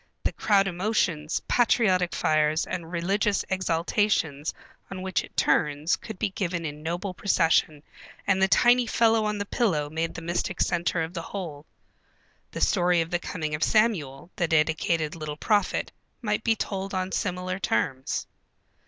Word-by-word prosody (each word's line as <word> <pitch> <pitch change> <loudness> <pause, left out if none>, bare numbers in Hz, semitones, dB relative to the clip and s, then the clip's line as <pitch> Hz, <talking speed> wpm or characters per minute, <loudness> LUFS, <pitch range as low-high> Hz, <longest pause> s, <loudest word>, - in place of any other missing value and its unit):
The - - +1
crowd 200 -2 +3
emotions, 175 -5 -1
patriotic 190 -7 +2
fires, 155 +1 +2
and 165 -1 -5
religious 195 +4 0
exaltations 170 -4 0 0.4
on 185 -1 -6
which 190 0 0
it - - -14
turns 150 +3 +2
could 220 - -9
be 210 -1 -1
given 175 -3 -3
in 150 0 -6
noble 175 +4 -3
procession 160 -5 +2 0.4
and 190 -1 +2
the 190 - +5
tiny 245 +4 +4
fellow 225 -1 +3
on 210 0 -1
the 205 - -3
pillow 160 -10 0
made 165 +1 -2
the 165 - -7
mystic 175 +2 -2
centre 175 -1 +1
of 160 +2 -6
the 170 - -4
whole. 165 -5 -7 0.8
The - - -6
story 180 -2 +3
of 165 +1 -4
the 175 - +1
coming 155 -3 -4
of 150 - -1
Samuel, 185 - +1
the 175 - +1
dedicated 160 0 +1
little 155 -2 -6
prophet, 205 +2 +1 0.3
might 210 -2 -1
be 225 -1 +3
told 195 -2 -4
on 185 0 -2
similar 185 -1 -2
terms. 130 - -1
180 Hz, 155 wpm, -26 LUFS, 160-200 Hz, 0.8 s, the